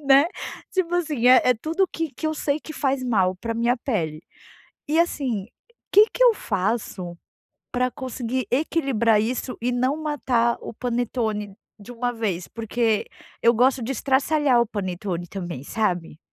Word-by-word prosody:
né. 275 Hz, +3 st, +6 dB, 0.5 s
Tipo 355 Hz, -2 st, 0 dB
assim, 300 Hz, -8 st, 0 dB
é 255 Hz, -, +8 dB
é 250 Hz, -, +4 dB
tudo 325 Hz, -, 0 dB
que 325 Hz, -1 st, -3 dB
que 315 Hz, -, -4 dB
eu 310 Hz, -, 0 dB
sei 290 Hz, 0 st, 0 dB
que 310 Hz, -, -9 dB
faz 270 Hz, -3 st, 0 dB
mal 190 Hz, -7 st, +2 dB
para 230 Hz, +4 st, -4 dB
minha 235 Hz, +2 st, +2 dB
pele. 165 Hz, -, -2 dB, 0.7 s
E 315 Hz, +2 st, +2 dB
assim, 260 Hz, -, 0 dB, 0.4 s
que 415 Hz, +2 st, +8 dB
que -, -, +3 dB
eu 485 Hz, -, +7 dB
faço 195 Hz, -, -2 dB, 0.5 s
para 250 Hz, 0 st, +1 dB
conseguir 255 Hz, -2 st, -3 dB
equilibrar 255 Hz, -6 st, +2 dB
isso 250 Hz, +3 st, -3 dB
e 245 Hz, +2 st, 0 dB
não 255 Hz, +3 st, +1 dB
matar 245 Hz, -6 st, +1 dB
o -, -, -8 dB
panetone 225 Hz, -4 st, -2 dB, 0.2 s
de 205 Hz, +4 st, -11 dB
uma 245 Hz, +1 st, -1 dB
vez? 200 Hz, -6 st, -2 dB
Porque 225 Hz, -1 st, -1 dB, 0.3 s
eu 235 Hz, -, +5 dB
gosto 255 Hz, +3 st, +3 dB
de 235 Hz, +4 st, -2 dB
estraçalhar 270 Hz, -1 st, +2 dB
o 235 Hz, -, 0 dB
panetone 185 Hz, -4 st, -3 dB
também, 175 Hz, -8 st, -6 dB
sabe? 175 Hz, -6 st, -2 dB
245 Hz, 160 wpm, -24 LUFS, 210-275 Hz, 0.7 s, é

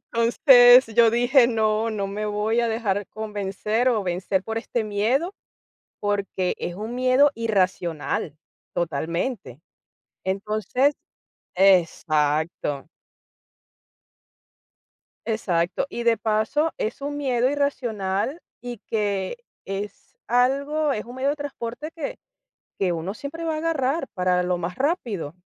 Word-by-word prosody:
Entonces, 245 Hz, +2 st, +6 dB
yo 225 Hz, 0 st, +4 dB
dije: 245 Hz, +2 st, +4 dB
"No, 220 Hz, -1 st, +1 dB
no 200 Hz, -2 st, -2 dB
me 210 Hz, +2 st, -4 dB
voy 210 Hz, +3 st, 0 dB
a 235 Hz, -, +1 dB
dejar 205 Hz, -3 st, -1 dB
convencer 210 Hz, +2 st, -2 dB
o 225 Hz, -4 st, +1 dB
vencer 185 Hz, +1 st, -1 dB
por 225 Hz, +1 st, -3 dB
este 235 Hz, 0 st, -2 dB
miedo, 230 Hz, -, 0 dB, 0.7 s
porque 200 Hz, -3 st, -1 dB
es 175 Hz, -, -4 dB
un 220 Hz, +5 st, -5 dB
miedo 255 Hz, +3 st, +4 dB
irracional, 185 Hz, -, -1 dB, 0.4 s
totalmente". 170 Hz, -, -3 dB, 0.6 s
Entonces 215 Hz, +8 st, 0 dB, 0.6 s
Exacto. 155 Hz, -5 st, +2 dB, 2.4 s
Exacto. 180 Hz, -6 st, 0 dB
Y 235 Hz, -, -4 dB
de 235 Hz, -1 st, +4 dB
paso, 220 Hz, +9 st, 0 dB
es 220 Hz, +6 st, -3 dB
un 290 Hz, +1 st, -3 dB
miedo 255 Hz, -3 st, +1 dB
irracional 250 Hz, -, -1 dB, 0.2 s
y 245 Hz, -1 st, -6 dB
que 200 Hz, -3 st, -2 dB, 0.3 s
es 200 Hz, +1 st, -7 dB
algo, 280 Hz, +5 st, +2 dB
es 210 Hz, -, -3 dB
un 245 Hz, +2 st, -11 dB
medio 265 Hz, +2 st, 0 dB
de 290 Hz, -, 0 dB
transporte 285 Hz, 0 st, -6 dB
que 315 Hz, -4 st, -5 dB, 0.6 s
que 185 Hz, -3 st, +1 dB
uno 170 Hz, +5 st, -4 dB
siempre 290 Hz, +5 st, -7 dB
va 325 Hz, -1 st, -1 dB
a -, -, -2 dB
agarrar, 310 Hz, -2 st, 0 dB
para 180 Hz, -2 st, +1 dB
lo 180 Hz, 0 st, 0 dB
más 175 Hz, +1 st, -4 dB
rápido. 235 Hz, -, -2 dB
220 Hz, 120 wpm, -24 LUFS, 190-255 Hz, 2.4 s, Entonces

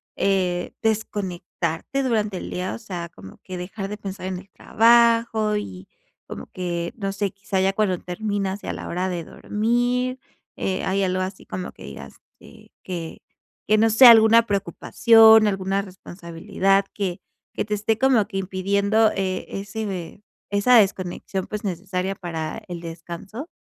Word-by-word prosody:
eh, 180 Hz, -3 st, 0 dB
desconectarte 200 Hz, 0 st, -2 dB
durante 215 Hz, -6 st, 0 dB
el -, -, -6 dB
día, 180 Hz, +1 st, -3 dB
o -, -, -6 dB
sea, 180 Hz, -6 st, -6 dB
como 95 Hz, -11 st, -14 dB
que 185 Hz, -1 st, -7 dB
dejar 195 Hz, +2 st, -6 dB
de 210 Hz, -, -5 dB
pensar 195 Hz, -2 st, -6 dB
en 185 Hz, -1 st, -3 dB
el 190 Hz, +1 st, -16 dB
trabajo 230 Hz, -1 st, +3 dB
y 95 Hz, -, -7 dB, 0.4 s
como -, -, -7 dB
que, 175 Hz, -2 st, -3 dB
no 195 Hz, -3 st, -2 dB
sé, 200 Hz, -1 st, -2 dB
quizá 195 Hz, 0 st, -3 dB
ya 195 Hz, 0 st, +2 dB
cuando 195 Hz, -3 st, +1 dB
terminas 200 Hz, +1 st, -3 dB
y -, -, -8 dB
a -, -, -2 dB
la -, -, -7 dB
hora 180 Hz, +2 st, -2 dB
de 175 Hz, -2 st, -3 dB
dormir, 245 Hz, +6 st, -1 dB, 0.4 s
eh, 190 Hz, -1 st, -2 dB
¿hay 195 Hz, +1 st, 0 dB
algo 185 Hz, 0 st, 0 dB
así 185 Hz, +1 st, -5 dB
como 180 Hz, -1 st, -5 dB
que -, -, -15 dB
digas 70 Hz, 0 st, -10 dB, 0.3 s
este, -, -, -17 dB
que 170 Hz, -3 st, -6 dB, 0.5 s
que 215 Hz, -, +4 dB
no 225 Hz, +1 st, +4 dB
sé 225 Hz, +4 st, +7 dB
alguna 230 Hz, 0 st, +8 dB
preocupación, 220 Hz, +2 st, +5 dB
alguna 195 Hz, 0 st, 0 dB
responsabilidad 190 Hz, +1 st, -1 dB
que 190 Hz, -4 st, -3 dB, 0.3 s
que -, -, -2 dB
te 210 Hz, -, -3 dB
esté 215 Hz, +1 st, 0 dB
como 255 Hz, -6 st, +3 dB
que 195 Hz, -3 st, -5 dB
impidiendo 200 Hz, +3 st, +1 dB
eh, 190 Hz, -1 st, -2 dB
ese 200 Hz, +3 st, -5 dB
ve 190 Hz, 0 st, -6 dB, 0.3 s
esa 205 Hz, +5 st, +4 dB
desconexión, 190 Hz, -2 st, 0 dB
pues, 210 Hz, 0 st, -6 dB
necesaria 185 Hz, +1 st, -3 dB
para 165 Hz, +1 st, -5 dB
el 175 Hz, -1 st, -5 dB
descanso? 170 Hz, -, -8 dB
195 Hz, 160 wpm, -23 LUFS, 180-215 Hz, 0.5 s, alguna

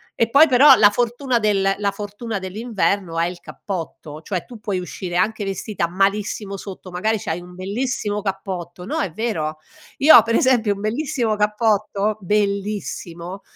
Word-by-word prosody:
e 230 Hz, -, +1 dB
poi 285 Hz, +6 st, +7 dB
però 270 Hz, +2 st, +8 dB
la 205 Hz, -, +6 dB
fortuna 245 Hz, +3 st, 0 dB
del 195 Hz, -3 st, +2 dB
la 200 Hz, -1 st, 0 dB
fortuna 205 Hz, +2 st, -5 dB
dell'inverno 195 Hz, -3 st, -2 dB
è 165 Hz, -, +2 dB
il 175 Hz, 0 st, -5 dB
cappotto, 165 Hz, -4 st, -7 dB
cioè 180 Hz, +1 st, -4 dB
tu 240 Hz, -3 st, -12 dB
puoi 200 Hz, -3 st, -2 dB
uscire 180 Hz, 0 st, -5 dB
anche 210 Hz, +3 st, 0 dB
vestita 195 Hz, -2 st, -2 dB
malissimo 200 Hz, +2 st, -1 dB
sotto, 190 Hz, -1 st, -9 dB
magari 215 Hz, +5 st, 0 dB
c'hai 165 Hz, -2 st, -4 dB
un 180 Hz, 0 st, -13 dB
bellissimo 210 Hz, +2 st, -2 dB
cappotto 185 Hz, -3 st, -5 dB
no -, -, -2 dB
è 195 Hz, -, -1 dB
vero, 160 Hz, -7 st, -2 dB, 0.4 s
io 305 Hz, +3 st, +8 dB
ho -, -, +9 dB
per 230 Hz, 0 st, -1 dB
esempio 240 Hz, -5 st, +3 dB
un 200 Hz, -, -9 dB
bellissimo 235 Hz, -1 st, -1 dB
cappotto, 210 Hz, -1 st, 0 dB
bellissimo, 200 Hz, -2 st, -2 dB
205 Hz, 160 wpm, -21 LUFS, 185-220 Hz, 0.4 s, ho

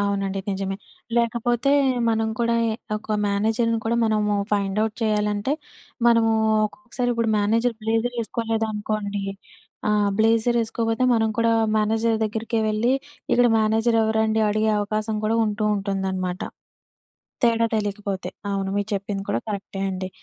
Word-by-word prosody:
అవునండి 195 Hz, -1 st, -1 dB
నిజమే. 195 Hz, 0 st, -2 dB, 0.4 s
లేకపోతే 235 Hz, +2 st, +1 dB, 0.4 s
మనం 225 Hz, 0 st, +1 dB
కూడా 235 Hz, 0 st, +2 dB
ఎ -, -, +1 dB, 0.3 s
ఒక 215 Hz, 0 st, -3 dB
మేనేజర్‌ని 225 Hz, +3 st, +1 dB
కూడా 230 Hz, +1 st, +1 dB
మనము 210 Hz, -1 st, +1 dB, 0.2 s
ఫైండ్ 200 Hz, -1 st, 0 dB
ఔట్ 220 Hz, -1 st, -3 dB
చేయాలంటే, 210 Hz, +2 st, 0 dB, 0.5 s
మనము 230 Hz, -1 st, +5 dB, 0.4 s
ఒక్కొక్కసారి 245 Hz, +2 st, -4 dB
ఇప్పుడు 230 Hz, -1 st, 0 dB
మేనేజర్ 230 Hz, +4 st, +1 dB
బ్లేజర్ 225 Hz, +2 st, 0 dB
ఎసుకోలేదనుకోండి 215 Hz, -3 st, -2 dB, 0.6 s
ఆ! -, -, +3 dB, 0.3 s
బ్లేజర్ 225 Hz, +2 st, +3 dB
ఎసుకోకపోతే, 225 Hz, +2 st, -1 dB
మనం 225 Hz, -1 st, +2 dB
కూడా 230 Hz, 0 st, +3 dB, 0.2 s
మేనేజర్ 220 Hz, +1 st, +2 dB
దగ్గరికే 225 Hz, +2 st, -2 dB
వెళ్లి 215 Hz, +4 st, +1 dB, 0.4 s
ఇక్కడ 245 Hz, -, +5 dB
మేనేజర్ 220 Hz, +2 st, +2 dB
ఎవరండి 220 Hz, 0 st, +1 dB
అడిగే 215 Hz, +1 st, +1 dB
అవకాశం 215 Hz, +1 st, -2 dB
కూడా 225 Hz, +1 st, +1 dB
ఉంటూ 210 Hz, 0 st, -2 dB
ఉంటుందనమాట. 190 Hz, -2 st, -2 dB, 1.0 s
తేడా 230 Hz, -1 st, +3 dB
తెలియకపోతే 205 Hz, -2 st, -2 dB, 0.2 s
అవును. 195 Hz, -1 st, -1 dB
మీరు 205 Hz, 0 st, 0 dB
చెప్పింది 200 Hz, 0 st, -2 dB
కూడా 205 Hz, -, +1 dB
కరెక్టే 200 Hz, -1 st, -5 dB
అండి. 185 Hz, 0 st, -4 dB
220 Hz, 130 wpm, -23 LUFS, 205-230 Hz, 1.0 s, మనము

